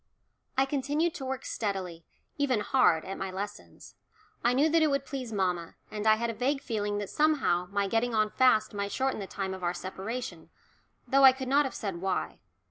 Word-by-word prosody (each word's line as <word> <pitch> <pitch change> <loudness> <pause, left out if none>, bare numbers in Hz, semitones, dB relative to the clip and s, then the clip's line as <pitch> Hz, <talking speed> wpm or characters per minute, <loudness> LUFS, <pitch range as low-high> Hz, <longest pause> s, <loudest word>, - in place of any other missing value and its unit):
I 265 - +4
continued 290 +4 0
to 270 - -6
work 265 0 -4
steadily 185 -6 -4 0.3
even 265 -6 +1
hard 205 -9 +3
at 195 - -6
my 195 - -3
lessons. 200 +2 -7 0.5
I 240 +1 +3
knew 285 +4 +4
that 325 +1 +3
it 310 - +4
would 275 -1 0
please 260 -4 -5
mamma, 180 -5 -1 0.2
and 215 0 -3
I 215 - +7
had 235 +1 -1
a - - -7
vague 260 +5 0
feeling 205 -3 -2
that 205 -1 -3
somehow 275 - +2
my 200 0 0
getting 230 +3 0
on 215 -1 +2
fast 220 -5 +3
might 200 0 -3
shorten 265 -2 -1
the 195 - -5
time 190 -1 -4
of 190 - -7
our 175 0 -1
separation, 195 +7 -6 0.6
though 275 0 +4
I 265 -1 +10
could 260 0 -6
not 285 +2 +4
have 265 - -4
said 195 -5 -4
why. 185 +1 -2
220 Hz, 205 wpm, -29 LUFS, 195-265 Hz, 0.6 s, I